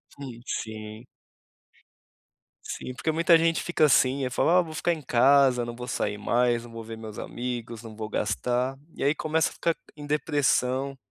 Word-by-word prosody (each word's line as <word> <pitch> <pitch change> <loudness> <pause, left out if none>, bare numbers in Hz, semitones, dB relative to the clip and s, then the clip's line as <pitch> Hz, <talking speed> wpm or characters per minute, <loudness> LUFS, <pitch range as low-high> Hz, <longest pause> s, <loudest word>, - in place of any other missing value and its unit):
Sim, 130 -5 -9
sim. 110 +1 -6 1.6
Sim, 130 - -6
porque 160 +5 -1
muita 165 +1 +5
gente 165 0 +1
fica 175 -3 +2
assim, 135 -1 +3
eu 125 - -3
falo: - - +2
"Ah 180 +1 +6
vou 160 -2 -7
ficar 175 +2 +1
em 155 - -6
casa, 130 -1 +4
não 120 - -6
vou 125 +1 -7
sair 105 0 -2
mais, 120 +2 +1
não 120 - -12
vou 115 0 -7
ver 115 0 -8
meus 110 -2 -9
amigos, 120 -2 -5
não 110 -2 -10
vou 110 0 -5
gastar", 125 +5 -1 0.2
e - - -4
aí 145 +3 +3
começa 160 +1 +1
a - - -13
ficar 170 -1 0 0.2
em 145 -1 -9
depressão, 140 -3 +1
125 Hz, 185 wpm, -26 LUFS, 115-150 Hz, 1.6 s, Ah